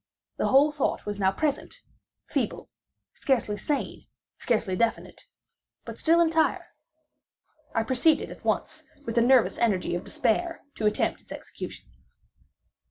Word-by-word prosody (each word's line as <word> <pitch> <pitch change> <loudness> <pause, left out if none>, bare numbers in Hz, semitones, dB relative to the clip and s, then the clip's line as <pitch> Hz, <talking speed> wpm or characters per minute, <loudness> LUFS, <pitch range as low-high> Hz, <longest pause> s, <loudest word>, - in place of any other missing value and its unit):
The - - 0
whole 280 +3 +5
thought 295 -2 -2
was 205 -1 -4
now 190 -1 +3
present—feeble, 285 +8 -4 0.4
scarcely 240 -6 0
sane, 280 +8 -3 0.3
scarcely 215 -6 0
definite,—but 230 +4 -5
still 330 +1 +4
entire. 325 -1 +1 1.1
I 225 - +2
proceeded 260 +7 +2
at - - -12
once, - - -2 0.2
with 230 - -3
the 235 - +3
nervous 250 0 +4
energy 205 -8 +1
of 175 - -2
despair, 335 +9 -1
to 215 - +1
attempt 210 - 0
its - - -22
execution. - - -8
240 Hz, 120 wpm, -27 LUFS, 210-295 Hz, 1.1 s, whole